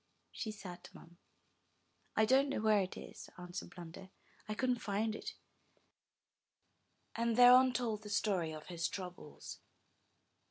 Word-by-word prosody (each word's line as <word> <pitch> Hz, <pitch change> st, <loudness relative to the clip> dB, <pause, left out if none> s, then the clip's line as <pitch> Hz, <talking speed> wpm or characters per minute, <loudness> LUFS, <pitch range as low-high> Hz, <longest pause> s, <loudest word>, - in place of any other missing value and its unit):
she 220 Hz, -, -4 dB
sat 190 Hz, -4 st, -9 dB
mum. 170 Hz, +1 st, -15 dB, 1.0 s
*'I 220 Hz, -, +5 dB
don't 270 Hz, +4 st, +4 dB
know 275 Hz, -, -1 dB
where 215 Hz, -1 st, +4 dB
it 185 Hz, -, -4 dB
is," -, -, -10 dB
answered 180 Hz, 0 st, -7 dB
Blunder. 175 Hz, +2 st, -10 dB, 0.4 s
'1 215 Hz, -, -3 dB
couldn't 250 Hz, -2 st, +1 dB
find 215 Hz, +2 st, 0 dB
it;" -, -, -6 dB, 1.8 s
and 230 Hz, 0 st, +1 dB
thereon 250 Hz, +1 st, +8 dB
told 230 Hz, -4 st, -1 dB
the 210 Hz, -, -9 dB
story 195 Hz, -6 st, +1 dB
of 155 Hz, -1 st, -8 dB
his 170 Hz, -2 st, -2 dB
troubles. 180 Hz, -5 st, -8 dB
210 Hz, 130 wpm, -35 LUFS, 180-235 Hz, 1.8 s, thereon